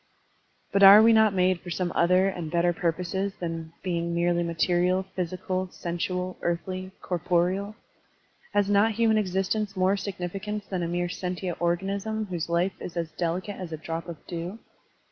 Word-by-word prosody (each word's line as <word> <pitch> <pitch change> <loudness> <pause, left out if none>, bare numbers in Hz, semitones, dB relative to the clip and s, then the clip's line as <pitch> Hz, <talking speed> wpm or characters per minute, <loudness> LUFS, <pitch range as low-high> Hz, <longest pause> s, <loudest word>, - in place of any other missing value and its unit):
But 200 - +2
are 195 +1 +11
we 225 +1 +7
not 220 -1 +5
made 185 -1 +2
for 180 - -9
some 175 0 -1
other 180 +2 +4
and 175 -4 -3
better 175 +1 +2
purposes 180 +4 -2
than 165 -2 -5
being 170 -2 -1
merely 175 0 +2
material, 175 +2 +1
physical, 185 +1 -2
sensual, 180 +1 -3
earthly, 185 +2 -2
corporeal? 180 +4 0 0.8
Has 205 -1 +3
not 205 +2 +3
human 220 0 +3
existence 195 +1 -1
more 185 +2 +3
significance 200 +2 -4
than 185 -2 -3
a 170 - -1
mere 175 +1 -1
sentient 180 0 -4
organism 195 +5 -1
whose 170 -2 -3
life 175 +3 +1
is 175 - -7
as 165 -2 -2
delicate 180 +5 -3
as 180 -3 -7
a 160 - -4
drop 165 +2 -5
of 170 -2 -6
dew? 175 +4 -5
180 Hz, 160 wpm, -27 LUFS, 170-195 Hz, 0.8 s, are